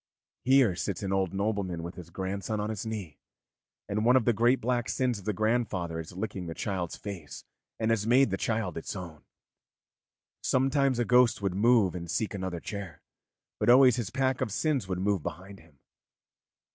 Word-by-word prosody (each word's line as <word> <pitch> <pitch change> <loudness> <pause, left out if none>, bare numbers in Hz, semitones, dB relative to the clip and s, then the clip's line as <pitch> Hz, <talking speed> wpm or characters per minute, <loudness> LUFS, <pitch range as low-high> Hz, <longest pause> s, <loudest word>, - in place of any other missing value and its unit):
Here 130 -7 +4
sits 100 +2 -3
an 95 0 -1
old 95 -3 +1
nobleman 100 -4 -2
with 85 +1 -6
his 90 -2 -11
grandson 100 +4 -3
on 105 +1 -2
his 110 +1 -5
knee, 100 -10 -6 0.7
and 105 +1 -1
one 125 +3 +5
of 130 -4 +3
the 120 - +4
great 120 +4 +3
black 120 0 -1
sins 125 -5 0
of 95 - -14
the 105 - +1
grandfather 105 -6 -1
is 80 - -7
licking 95 -3 -4
the 80 - -5
child's 95 -5 -3
face 90 -8 -8 0.3
and 110 0 0
has 110 -1 0
made 130 -1 +4
the - - +1
child 110 -7 -2
its 80 - -6
own. 85 -5 -8 1.2
Sometimes 135 0 +2
a 120 - +1
ghost 125 -3 +4
would 95 -2 0
move 105 -1 +4
and 85 -1 -6
seek 105 +4 -1
another 95 -3 -4
chair, 100 -2 -7 0.6
but - - +1
always 125 -1 +7
his 120 -6 -2
pack 130 -1 0
of 110 - -1
sins 135 - 0
would 95 -1 -2
move 100 -1 0
behind 95 +6 -7
him. 80 -3 -21
100 Hz, 185 wpm, -29 LUFS, 90-120 Hz, 1.2 s, always